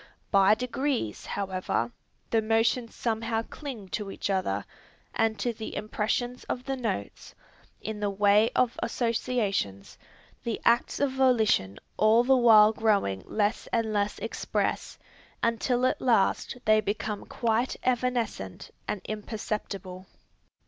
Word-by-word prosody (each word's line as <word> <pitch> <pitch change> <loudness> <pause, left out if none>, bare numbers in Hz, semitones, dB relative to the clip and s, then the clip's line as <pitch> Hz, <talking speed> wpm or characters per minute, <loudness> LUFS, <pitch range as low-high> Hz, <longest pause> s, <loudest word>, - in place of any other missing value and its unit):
By 195 +1 +6
degrees, 250 - -2
however, 185 -11 -2 0.4
the 225 - +3
motions 225 +2 +1
somehow 225 -1 -1
cling 235 -8 -8
to 195 +5 -3
each 195 - -3
other, 105 - -1 0.5
and 225 -1 +1
to 240 - -1
the 220 0 -7
impressions 220 +4 -2
of 250 - -3
the 270 0 -2
notes, 225 - -4 0.5
in 220 -1 -5
the 205 -1 0
way 205 +2 +4
of 250 -2 +1
associations, 220 - -1 0.4
the 230 -2 -2
acts 235 +1 +3
of 285 -2 +2
volition 225 - +2 0.2
all 220 +2 +5
the 265 +2 +4
while 220 -3 +7
growing 205 - +1
less 210 0 0
and 225 -2 0
less 205 0 0
express, - - -2 0.5
until 240 +2 +1
at 255 - 0
last 235 0 +2
they 215 0 +5
become 210 0 -3
quite 235 +2 0
evanescent 240 - -1 0.2
and 205 - -2
imperceptible. 205 -3 -5
220 Hz, 125 wpm, -28 LUFS, 200-240 Hz, 0.5 s, while